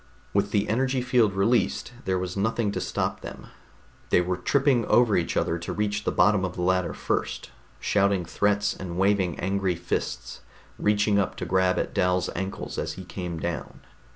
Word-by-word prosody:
With 100 0 +2
the 105 0 +1
energy 130 +3 +1
field 120 -5 +3
released, 95 - +1
there 95 -1 +1
was 90 0 -3
nothing 110 +1 0
to - - -3
stop - - -2
them; - - -9 0.6
they - - +5
were 90 +1 0
tripping 135 +5 +2
over 120 -4 +4
each 85 - 0
other 85 - 0
to 85 - -5
reach 105 0 -1
the - - +1
bottom 100 -2 +3
of 90 -1 -3
the 90 - -3
ladder 90 0 +1
first, - - -2 0.3
shouting 100 -3 +2
threats 105 +3 +1
and 90 -2 -6
waving 95 -3 +2
angry 95 -1 0
fists, 65 -7 -4 0.4
reaching 105 0 +3
up 100 - -1
to - - -5
grab 95 -1 +2
at - - -2
Dal's 90 0 +1
ankles 95 +2 -4
as - - -3
he 95 - -9
came 90 -2 -5
down.... 85 -1 -5
95 Hz, 180 wpm, -26 LUFS, 90-105 Hz, 0.6 s, they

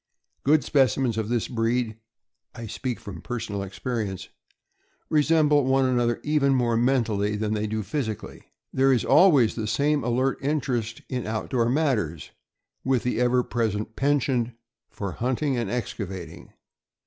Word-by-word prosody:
Good 150 +2 +4
specimens 130 -4 +2
of 110 -1 -2
this 120 -2 0
breed 115 -1 0 0.6
(I 115 - -7
speak 125 +3 -4
from 95 -6 -9
personal 110 -4 -4
experience) 100 0 -4 0.8
resemble 150 -1 +4
one 135 +1 +3
another 120 -2 +1
even 145 -2 +2
more 120 -2 +1
mentally 115 -4 +1
than 105 0 -1
they 105 0 -1
do 110 0 -2
physically. 110 0 -5 0.2
There 135 +1 +4
is 125 -4 +2
always 145 - +5
the 110 -2 -3
same 145 +6 +1
alert 130 +3 0
interest 130 -6 -2
in 125 -3 -3
outdoor 115 +2 0
matters, 120 - 0 0.5
with 130 -2 +1
the 125 -2 -1
ever 125 0 +3
present 110 -2 -2
penchant 135 -4 +1 0.4
for 100 -2 -5
hunting 130 - -1
and 120 -4 -2
excavating. 95 -7 -5
120 Hz, 135 wpm, -25 LUFS, 110-135 Hz, 0.8 s, always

